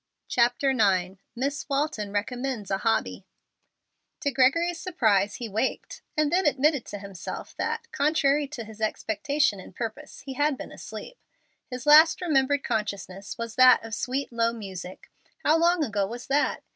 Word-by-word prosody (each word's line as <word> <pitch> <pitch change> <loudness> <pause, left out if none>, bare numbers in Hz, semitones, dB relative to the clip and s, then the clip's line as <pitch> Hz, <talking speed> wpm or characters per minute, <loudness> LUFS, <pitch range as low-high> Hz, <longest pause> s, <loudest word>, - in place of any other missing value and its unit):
CHAPTER 245 +3 +2
IX 190 -5 +1
MISS 275 +5 -3
WALTON 275 -8 -1
RECOMMENDS 235 +1 -3
A 195 - +1
HOBBY 225 +1 0 1.0
To 285 - 0
Gregory's 325 +7 +2
surprise 210 - +1
he 240 - -5
waked 220 +5 -3 0.2
and 305 -1 +2
then 370 -2 +3
admitted 285 -1 +2
to 205 - -6
himself 195 -2 -8
that, 460 0 -2
contrary 290 -1 +2
to 265 -5 -7
his 220 0 -12
expectation 220 +2 0
and 185 - -12
purpose, 240 +6 -6
he 270 - -7
had 290 +1 +1
been - - -8
asleep. - - -9 0.5
His 250 -1 -6
last 310 +2 +7
remembered 285 -4 +1
consciousness 200 -3 -4
was 230 -1 -5
that 255 -2 +7
of 225 - -8
sweet, 260 +4 -2
low 230 0 +2
music; 190 -5 -9 0.2
and - - -37
how 315 +2 +4
long 340 0 +3
ago 205 -7 -1
was 240 +3 -7
that? 290 +2 0
255 Hz, 160 wpm, -26 LUFS, 210-290 Hz, 1.0 s, last